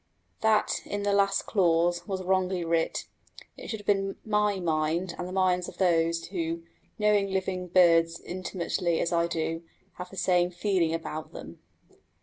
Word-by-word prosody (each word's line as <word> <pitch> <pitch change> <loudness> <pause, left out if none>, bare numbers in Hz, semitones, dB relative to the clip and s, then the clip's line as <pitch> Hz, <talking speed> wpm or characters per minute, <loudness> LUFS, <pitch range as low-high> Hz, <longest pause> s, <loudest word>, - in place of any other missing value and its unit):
That, 220 -1 +2
in 205 0 -4
the 205 0 +1
last 200 0 +2
clause, 175 -2 +1
was 190 -1 -3
wrongly 185 -1 0
writ. 165 0 0 0.5
It - - -10
should 220 - -4
have - - -21
been 195 -1 +1
my 210 -2 +1
mind, 165 +1 0
and 180 - -5
the - - -7
minds 185 -1 +1
of - - -14
those 165 -2 +2
who, 165 -2 -3 0.3
knowing 210 -2 +2
living 190 -1 -2
birds 165 -2 +4
intimately 180 -1 -2
as 170 - 0
I 170 0 +2
do, 165 0 -2 0.4
have 180 0 -7
the 195 - -12
same 180 -1 +2
feeling 180 -2 0
about 155 -1 -6
them. - - -10
180 Hz, 160 wpm, -28 LUFS, 170-195 Hz, 0.5 s, birds